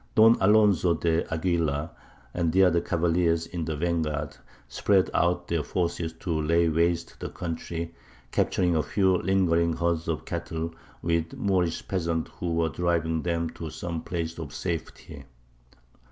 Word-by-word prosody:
Don 115 Hz, 0 st, +7 dB
Alonzo 100 Hz, -4 st, +4 dB
de 85 Hz, +1 st, 0 dB
Aguilar, 80 Hz, -2 st, 0 dB, 0.4 s
and 85 Hz, -2 st, 0 dB
the 95 Hz, +3 st, +5 dB
other 85 Hz, -2 st, +4 dB
cavaliers 85 Hz, -1 st, +1 dB
in 85 Hz, 0 st, -5 dB
the 80 Hz, -1 st, -2 dB
van 85 Hz, +1 st, 0 dB
guard, 75 Hz, -2 st, -3 dB, 0.3 s
spread 95 Hz, +10 st, +2 dB
out 90 Hz, +1 st, +1 dB
their 85 Hz, -2 st, 0 dB
forces 85 Hz, 0 st, -2 dB
to 80 Hz, -1 st, -2 dB
lay 85 Hz, +2 st, +3 dB
waste 85 Hz, +1 st, 0 dB
the -, -, -4 dB
country, 85 Hz, 0 st, -5 dB, 0.4 s
capturing 90 Hz, -2 st, +1 dB
a 80 Hz, -, +3 dB
few 95 Hz, +5 st, +2 dB
lingering 85 Hz, -3 st, +2 dB
herds 85 Hz, -1 st, -1 dB
of 80 Hz, -2 st, -2 dB
cattle, 85 Hz, -1 st, -4 dB, 0.3 s
with 85 Hz, -1 st, +1 dB
the -, -, -11 dB
Moorish 90 Hz, -4 st, 0 dB
peasants 85 Hz, -3 st, -1 dB
who 85 Hz, -2 st, -1 dB
were 80 Hz, -1 st, +1 dB
driving 80 Hz, 0 st, 0 dB
them 85 Hz, -1 st, -1 dB
to 80 Hz, -, -7 dB
some 85 Hz, +1 st, -5 dB
place 85 Hz, -2 st, -4 dB
of 75 Hz, -4 st, -6 dB
safety. 80 Hz, -4 st, -5 dB
85 Hz, 155 wpm, -27 LUFS, 80-90 Hz, 0.4 s, Don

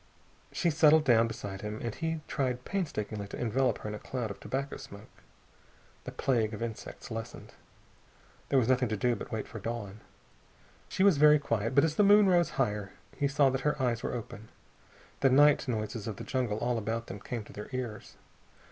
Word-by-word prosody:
She 170 Hz, -, +1 dB
settled 155 Hz, 0 st, +5 dB
down 115 Hz, -4 st, +4 dB
beside 100 Hz, -4 st, -6 dB
him, 105 Hz, +1 st, -5 dB
and 115 Hz, -2 st, -4 dB
he 160 Hz, +2 st, -3 dB
tried 125 Hz, -2 st, -2 dB
painstakingly 110 Hz, -, -3 dB
to -, -, -8 dB
envelope 120 Hz, 0 st, +1 dB
her -, -, -8 dB
in -, -, -5 dB
a 105 Hz, -, -6 dB
cloud 120 Hz, -5 st, -4 dB
of 100 Hz, -, -9 dB
tobacco 135 Hz, +6 st, -4 dB
smoke. 100 Hz, +2 st, -13 dB, 0.8 s
The -, -, -5 dB
plague 115 Hz, -4 st, 0 dB
of 105 Hz, -, -5 dB
insects 115 Hz, +1 st, -7 dB
lessened. 115 Hz, 0 st, -7 dB, 1.0 s
There 140 Hz, -, +3 dB
was 120 Hz, -4 st, +3 dB
nothing 125 Hz, -2 st, +2 dB
to 110 Hz, -, -1 dB
do 120 Hz, +4 st, +1 dB
but -, -, -8 dB
wait 110 Hz, -2 st, -3 dB
for 110 Hz, -, -8 dB
dawn. 105 Hz, -2 st, -5 dB, 0.9 s
She 190 Hz, -, 0 dB
was 195 Hz, -6 st, +5 dB
very 150 Hz, 0 st, +7 dB
quiet, 115 Hz, -4 st, -2 dB
but 140 Hz, -, +6 dB
as 160 Hz, -1 st, 0 dB
the 210 Hz, -, +5 dB
moon 205 Hz, 0 st, +7 dB
rose 175 Hz, -2 st, +3 dB
higher 105 Hz, -6 st, -1 dB, 0.2 s
he 145 Hz, -, +1 dB
saw 140 Hz, -1 st, +3 dB
that 135 Hz, 0 st, -2 dB
her 150 Hz, 0 st, 0 dB
eyes 120 Hz, -3 st, 0 dB
were -, -, -3 dB
open. 110 Hz, -2 st, -8 dB, 0.7 s
The 135 Hz, -, +4 dB
night 145 Hz, +2 st, +5 dB
noises 110 Hz, -2 st, -3 dB
of 110 Hz, -, -3 dB
the -, -, -8 dB
jungle 125 Hz, -6 st, -1 dB
all 120 Hz, +1 st, 0 dB
about 115 Hz, +2 st, -3 dB
them 100 Hz, -, -8 dB
came 115 Hz, +2 st, -5 dB
to -, -, -14 dB
their 105 Hz, -, -8 dB
ears. 120 Hz, -5 st, -5 dB
120 Hz, 200 wpm, -30 LUFS, 110-140 Hz, 1.0 s, very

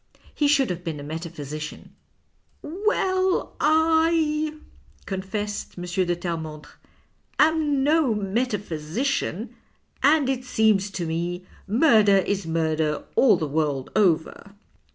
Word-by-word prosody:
He 295 Hz, -, +1 dB
should 275 Hz, -6 st, +3 dB
have 175 Hz, 0 st, -5 dB
been 160 Hz, -4 st, -4 dB
a -, -, -7 dB
metaphysician." 155 Hz, -1 st, -7 dB, 0.4 s
" -, -, -42 dB, 0.3 s
Well, 375 Hz, -3 st, +1 dB
I," 320 Hz, -1 st, +2 dB, 0.5 s
confessed 205 Hz, +2 st, -4 dB
M. 175 Hz, -, -6 dB
de 180 Hz, 0 st, 0 dB
Terremondrc, 160 Hz, -3 st, -5 dB, 0.4 s
" -, -, -43 dB, 0.3 s
am 305 Hz, -3 st, +3 dB
no 295 Hz, -5 st, +3 dB
metaphysician, 205 Hz, -, -2 dB, 0.5 s
and 290 Hz, 0 st, +4 dB
it 260 Hz, -1 st, -1 dB
seems 220 Hz, -5 st, +2 dB
to 180 Hz, -3 st, -4 dB
me 175 Hz, +2 st, -3 dB, 0.2 s
murder 215 Hz, -3 st, +5 dB
is 195 Hz, -1 st, -1 dB
murder 160 Hz, -2 st, 0 dB
all 225 Hz, -8 st, +5 dB
the 160 Hz, -, -2 dB
world 145 Hz, -3 st, -1 dB
over." 195 Hz, +1 st, +1 dB
200 Hz, 115 wpm, -24 LUFS, -, 0.5 s, murder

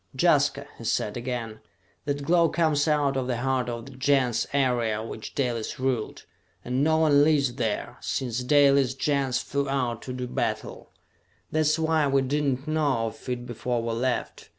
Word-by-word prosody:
"Jaska," 145 Hz, -4 st, +3 dB
he -, -, -8 dB
said 105 Hz, -2 st, -1 dB
again, 120 Hz, -3 st, -4 dB, 0.5 s
"that 145 Hz, -1 st, -2 dB
glow 170 Hz, +2 st, +3 dB
comes 155 Hz, -3 st, +1 dB
out 145 Hz, -3 st, +2 dB
of 130 Hz, -2 st, -1 dB
the 125 Hz, -2 st, -1 dB
heart 130 Hz, 0 st, 0 dB
of 120 Hz, -1 st, -5 dB
the 140 Hz, -, -11 dB
Gens 130 Hz, -3 st, +1 dB
area 120 Hz, -6 st, +1 dB
which 110 Hz, -1 st, -8 dB
Dalis 120 Hz, -4 st, -2 dB
ruled! 130 Hz, -4 st, -2 dB, 0.4 s
And 125 Hz, +3 st, 0 dB
no 160 Hz, +1 st, +3 dB
one 150 Hz, -3 st, +5 dB
lives 145 Hz, -5 st, +2 dB
there, 115 Hz, -3 st, -3 dB
since 125 Hz, -3 st, -2 dB
Dalis' 140 Hz, -1 st, +4 dB
Gens 135 Hz, -2 st, 0 dB
flew 140 Hz, 0 st, -2 dB
out 125 Hz, -4 st, -1 dB
to 125 Hz, -, -6 dB
do 125 Hz, 0 st, -4 dB
battle! -, -, -3 dB, 0.6 s
That's 155 Hz, 0 st, +2 dB
why 160 Hz, -2 st, +2 dB
we 135 Hz, -1 st, +2 dB
did 145 Hz, +3 st, 0 dB
not 135 Hz, +4 st, -17 dB
know 145 Hz, -7 st, +1 dB
of 120 Hz, -, -12 dB
it 125 Hz, -1 st, -3 dB
before 120 Hz, 0 st, -2 dB
we 115 Hz, -, -2 dB
left! 125 Hz, +2 st, -2 dB
135 Hz, 175 wpm, -26 LUFS, 120-145 Hz, 0.6 s, one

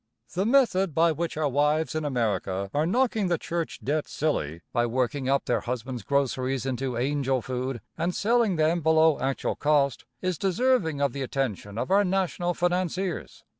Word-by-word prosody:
The 190 Hz, +4 st, 0 dB
method 195 Hz, -, +3 dB
by 165 Hz, +1 st, +4 dB
which 165 Hz, 0 st, -3 dB
our 155 Hz, -1 st, +1 dB
wives 150 Hz, +3 st, +1 dB
in 155 Hz, -1 st, -2 dB
America 100 Hz, -7 st, -1 dB
are 150 Hz, +2 st, +1 dB
knocking 225 Hz, -1 st, +1 dB
the 175 Hz, -1 st, +1 dB
church 170 Hz, +1 st, -4 dB
debt 150 Hz, +2 st, -1 dB
silly, 85 Hz, -, -2 dB
by 120 Hz, 0 st, +2 dB
working 130 Hz, +3 st, -1 dB
up 140 Hz, 0 st, +2 dB
their -, -, +1 dB
husbands' 125 Hz, 0 st, -4 dB
groceries 130 Hz, +1 st, 0 dB
into 130 Hz, -1 st, -2 dB
"angel 135 Hz, +1 st, 0 dB
food" 130 Hz, -2 st, -3 dB, 0.2 s
and 175 Hz, +1 st, 0 dB
selling 230 Hz, -2 st, +2 dB
them 160 Hz, +2 st, +2 dB
below 160 Hz, 0 st, +4 dB
actual 135 Hz, +1 st, -1 dB
cost, 145 Hz, -3 st, +1 dB
is 185 Hz, -3 st, -2 dB
deserving 195 Hz, -, +1 dB
of 140 Hz, -3 st, +1 dB
the 140 Hz, -, -4 dB
attention 120 Hz, -6 st, -3 dB
of 125 Hz, +9 st, -2 dB
our 200 Hz, +1 st, +5 dB
national 180 Hz, -2 st, 0 dB
financiers. 180 Hz, 0 st, -2 dB
150 Hz, 170 wpm, -26 LUFS, 130-175 Hz, 0.2 s, our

